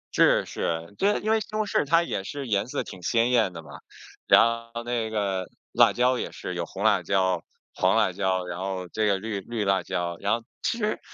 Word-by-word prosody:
是 - - +4
是。 85 +3 -3
对， 205 +1 +2
因 215 - 0
为 220 - +4
西 215 - -7
红 215 0 0
柿 190 - +1
它 165 +3 +4
也 95 - -3
是 140 +5 -5
颜 105 0 0
色 - - -2
挺 95 - -10
鲜 115 +6 +2
艳 115 -6 +3
的 85 -2 -9
嘛， - - -11 0.5
然 - - +8 0.3
后 115 - -4
那 120 -2 -2
个 100 -4 -1 0.3
辣 - - +5
椒 125 0 +2
也 - - -4
是 90 - -6
有 85 -1 -3
红 100 - -6
辣 105 -4 +4
椒、 95 -1 +1 0.3
黄 - - +2
辣 - - +3
椒， 95 -1 -1
然 90 0 -5
后 95 -1 -3
这 110 +3 0
个 100 -1 +2
绿 105 0 -4
绿 110 0 -3
辣 95 -1 +2
椒， 85 -1 -3
然 100 - -1
后 115 - -14 0.2
其 - - 0
实 215 -2 -1
100 Hz, 240 characters per minute, -26 LUFS, 95-120 Hz, 0.5 s, 然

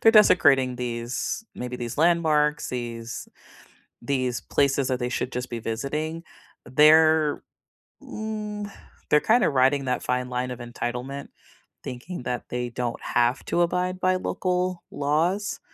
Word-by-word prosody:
they're 225 - +6
desecrating 140 - +5
these, 120 - -3
maybe, 125 0 -5
these 120 +1 -5
landmarks, 155 -3 +3
these 115 -2 -5 0.7
these 130 -1 -1
places 140 -1 +1
that 130 -1 -1
they 125 0 -1
should 125 0 -2
just 125 +1 -4
be 120 -1 -4
visiting. 150 +9 -3 0.4
They're 155 +2 +5 0.6
mm, 210 -1 -5 0.4
they're 150 - +6
kinda 225 +5 +3
riding 135 0 +3
that 125 - -1
fine 125 0 -1
line 125 0 -2
of 125 - -6
entitlement, 125 +3 -5 0.5
thinking 125 +4 -6
that 125 -1 -4
they 125 0 -2
don't 120 0 -3
have 120 +2 +1
to 175 - +1
abide 180 +1 0
by 185 0 +2
local 185 -1 -1
laws, 165 +8 0
140 Hz, 135 wpm, -25 LUFS, 125-170 Hz, 0.7 s, they're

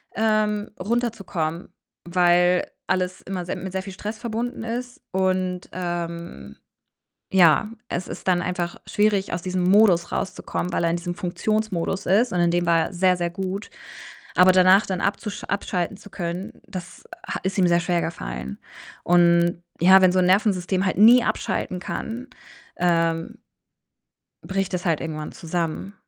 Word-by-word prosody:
ähm, 215 -1 +1
runterzukommen, 195 -7 -2 0.4
weil 180 0 +3 0.2
alles 185 0 -1
immer 185 -2 -5
sehr 175 - -3
mit 190 -1 -6
sehr 190 0 -3
viel 195 -1 -8
Stress 210 +3 -6
verbunden 235 0 -4
ist 245 +2 -5
und, 185 -1 -1
ähm, 170 - -5 0.7
ja, 180 +1 +5 0.2
es 180 - -4
ist - - -8
dann 180 -1 +3
einfach 175 -1 -3
schwierig, 205 -2 +1
aus 170 - -2
diesem 185 -1 -1
Modus 185 -2 +4
rauszukommen, 185 -1 -3
weil - - 0
er 170 - +2
in 170 - 0
diesem 175 0 -5
Funktionsmodus 195 0 -2
ist 215 +7 +3
und 180 - 0
in 175 0 +3
dem 175 0 +1
war 170 -1 +4
er - - -11
sehr 185 +1 +3
sehr 175 -1 -1
gut. 190 +3 -5 0.7
Aber 185 +1 +7
danach 185 +2 +5
dann 185 -2 -2
abzusch 205 +1 -2
abschalten 190 -2 -2
zu 205 - -14
können, 175 +1 -4
das 180 -1 -8 0.2
ha - - -3
ist 190 +1 -2
ihm 185 -2 +4
sehr 170 0 +3
schwergefallen 65 - -3 0.4
und, 170 0 +3 0.2
ja, 190 +2 +7
wenn 185 - +5
so 185 - +2
'n 180 - +3
Nervensystem 190 -1 +2
halt 190 - 0
nie 235 +4 +7
abschalten 180 - -2
kann, 235 +7 -5 0.5
ähm, 165 -1 0 1.1
bricht 195 0 -2
das 180 - -3
halt 165 -3 +1
irgendwann 155 -1 -5
zusammen 170 +3 -4
185 Hz, 155 wpm, -23 LUFS, 175-195 Hz, 1.1 s, Aber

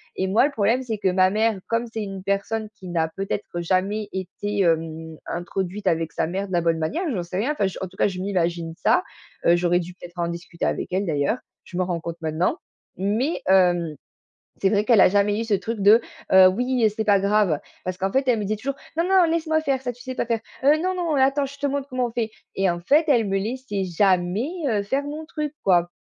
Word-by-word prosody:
Et 190 - -1
moi 215 +7 +4
le 295 - 0
problème 230 0 +1
c'est 225 -4 -3
que 190 -2 +1
ma 185 0 +4
mère, 215 0 +1
comme 230 +1 0
c'est 220 - -3
une 195 -2 -6
personne 205 +3 -1
qui 190 -4 -11
n'a 165 -2 0
peut-être 195 +3 -3 0.2
jamais 200 +4 0
été, 195 +2 -3
hem, 160 -1 -1
introduite 190 +3 -4
avec 165 -2 +1
sa - - 0
mère 195 +3 -3
de 185 - -8
la 170 - +2
bonne 165 -1 +1
manière, 160 - -1
j'en 185 - -1
sais 175 +2 -5
rien, 240 +9 +1
enfin 205 -10 0
j 190 - -6
en 190 - -2
tout 190 - -18
cas, - - +3
je 185 -2 -5
m'imagine 170 -4 -1
ça- 180 - +3 0.4
heu, 170 - +6
j'aurais 175 0 +2
dû 180 0 -6
peut-être 175 -1 -13
en 170 - 0
discuter 170 0 -5
avec - - -1
elle 190 +2 0
d'ailleurs, 150 - 0 0.3
je 180 - -8
m'en 185 - +1
rends 175 -2 -2
compte 170 0 -6
maintenant- 160 - 0 0.4
mais, 220 - 0
hem, 175 -4 +3 0.7
c'est 195 - +3
vrai 205 +1 +2
qu'elle 230 -4 +5
a - - +8
jamais 205 +2 +2
eu - - -1
ce 220 -2 +1
truc 225 +3 -2
de: 210 +4 +7 0.3
«Heu, 190 0 +9
oui 245 +3 +1
c'est 220 - -1
pas 200 -2 +4
grave». 200 -6 +2 0.2
Parce 185 0 -3
qu'en 195 +1 0
fait 270 0 +1
elle 240 -3 +3
me - - -2
disait 215 +2 -1
toujours: 275 +6 -3 0.2
«Non, 335 - +2
non 380 -1 +5
laisse-moi 320 -1 +1
faire 275 -4 0
ça, 250 -1 -2
tu 245 +1 -15
sais 255 0 -6
pas - - -1
faire. 230 -1 0 0.2
Heu, 290 +2 +6
non, 370 +1 0
non 335 -4 -1
attends, 275 +1 +3
je 280 +1 -11
te 285 - +1
montre 280 0 -2
comment 255 -2 -1
on - - -5
fait». 225 -2 -2 0.2
Et 195 -1 +2
en 175 0 -3
fait, 290 - +4
elle 235 -7 +3
me 195 0 +1
laissait 210 -2 -3
jamais, 185 - +1 0.2
heu, 210 -3 +1
faire 270 +8 -1
mon 300 +2 -6
truc, 300 -2 -4
quoi. 175 -2 +3
200 Hz, 240 wpm, -23 LUFS, 180-240 Hz, 0.7 s, Heu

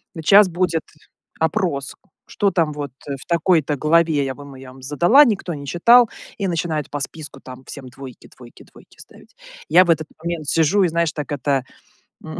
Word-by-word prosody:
"Сейчас 195 +6 +5
будет 170 -2 -1 0.6
опрос, 160 -5 -1 0.3
что 200 -1 0
там, 165 -4 0
вот, 145 -2 -6 0.2
э, 140 - -3
в - - -13
такой-то 165 -3 +1
главе, 155 -1 +2
я 135 -1 -4
вам 140 -1 -12
я 130 0 -12
вам 130 - -16
задала, 175 - +5
никто 200 -7 -2
не 140 -1 -8
читал" 235 - +5 0.3
и 200 - -2
начинает 165 -4 -2
по 145 - -4
списку 145 -1 -7
там 130 0 -12
всем 130 -3 -9
двойки, 130 -1 -12
двойки, 120 -2 -15
двойки - - -20
ставить. - - -17 0.3
Я 185 - +6
в 175 - -6
этот 160 -2 +1
момент 170 -3 -4
сижу 165 +7 +2
и, - - +3
знаешь, 170 -1 0
так 150 -1 -6
это, 140 -1 -1 0.6
м, - - -8
160 Hz, 185 wpm, -20 LUFS, 140-175 Hz, 0.6 s, Я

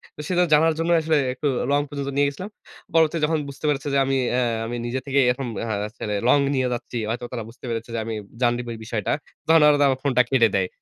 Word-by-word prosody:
তো - - -7
সেটা 180 0 +3
জানার 160 +2 +5
জন্যই 170 +1 +3
আসলে 155 -1 +2 0.2
একটু 145 +3 -2 0.2
লং 145 0 +3
পর্যন্ত 140 -1 -4
নিয়ে 145 0 +4
গেছিলাম। 185 +9 -8 0.4
পরবর্তী 165 0 +3
যখন 160 +1 +1
বুঝতে 140 +2 -8
পেরেছে 145 0 -1
যে, - - +3
আমি 135 0 +1 0.2
অ্যা 125 - +2 0.2
আমি 120 +1 -4
নিজে 125 +2 -2
থেকেই 140 -1 +2
এরকম 125 0 -1
দেখা 110 -2 -2
যাচ্ছে 105 +1 -9 0.3
লং 145 - +5 0.2
নিয়ে 130 -1 +1
যাচ্ছি। 120 0 -5
হয়তো 120 +1 -3
তারা 115 -3 -4
বুঝতে 125 +2 -13
পেরেছে 115 0 -4
যে, - - -1
আমি 115 - -4 0.3
জানি 120 0 +3
দিবো 120 -1 -6
এই - - -11
বিষয়টা। 110 -3 -2 0.4
তখন 160 -1 +6
ওরা 145 -1 +5
তো - - +4
আমার 130 -1 0
ফোনটা 125 -3 +3
কেটে 115 -4 +4
দেয়। 95 -1 +1
135 Hz, 240 wpm, -23 LUFS, 120-150 Hz, 0.4 s, তখন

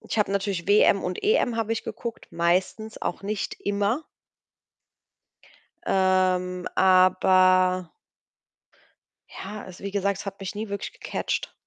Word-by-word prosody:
ich - - -4
habe 205 -2 +1
natürlich 195 -3 -2
WM 205 -1 +4
und 180 0 -4
EM 400 - +2
habe 225 -1 -1
ich 225 - -3
geguckt, 235 -1 -6
meistens, 185 +6 -1
auch 175 - -3
nicht 205 0 -3
immer. 205 +7 0 1.8
Ähm, 185 -1 +1
aber 185 -1 +4 1.4
ja, 210 0 -8
also, 185 0 -12
wie 200 - -4
gesagt, 200 -1 -1
es - - -7
hat 195 0 -6
mich 195 0 -6
nie 215 0 -5
wirklich 200 0 -5
gecatcht. - - -3
195 Hz, 130 wpm, -25 LUFS, 185-210 Hz, 1.8 s, WM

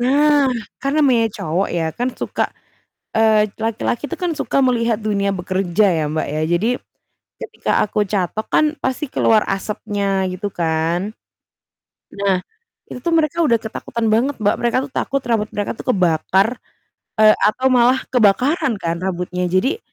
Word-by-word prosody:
Nah 285 +2 +3 0.3
kan 275 0 -1
namanya 250 -7 +3
cowok 170 +5 -1
ya 170 -2 -1
kan 245 +1 -2
suka - - -1 0.8
eee, 215 -1 +4
laki-laki 225 +3 -2
itu - - -6
kan 350 - +1
suka - - -1
melihat 235 -3 +2
dunia 200 -2 0
bekerja 185 +1 0
ya, 160 -3 0
Mbak, 155 - -1
ya 155 +1 -2
jadi 195 +7 +1 0.7
ketika - - -5
aku 210 - -2
catok 200 +2 -2
kan - - +5 0.2
pasti 260 +4 -1
keluar 220 -1 +3
asapnya 200 +1 -3 0.3
gitu 185 +3 -4
kan. 165 0 0 1.1
Nah 200 -1 +1 0.5
itu - - -7
tuh 340 - 0
mereka 305 -2 0
udah 235 -5 +3
ketakutan 225 +1 -4
banget, 265 +6 +1
Mbak, 205 0 +2
mereka 240 +1 +1
tuh - - -29
takut 275 -1 0
rambut 215 -2 +1
mereka 205 -1 -2
tuh - - -10
kebakar, 185 +3 +2 0.7
eee, 215 0 +7
atau 255 +5 +1
malah 250 +2 +4
kebakaran 250 - +3
kan 165 0 -1
rambutnya. 180 0 -2
Jadi, 260 - +1
215 Hz, 150 wpm, -19 LUFS, 185-250 Hz, 1.1 s, eee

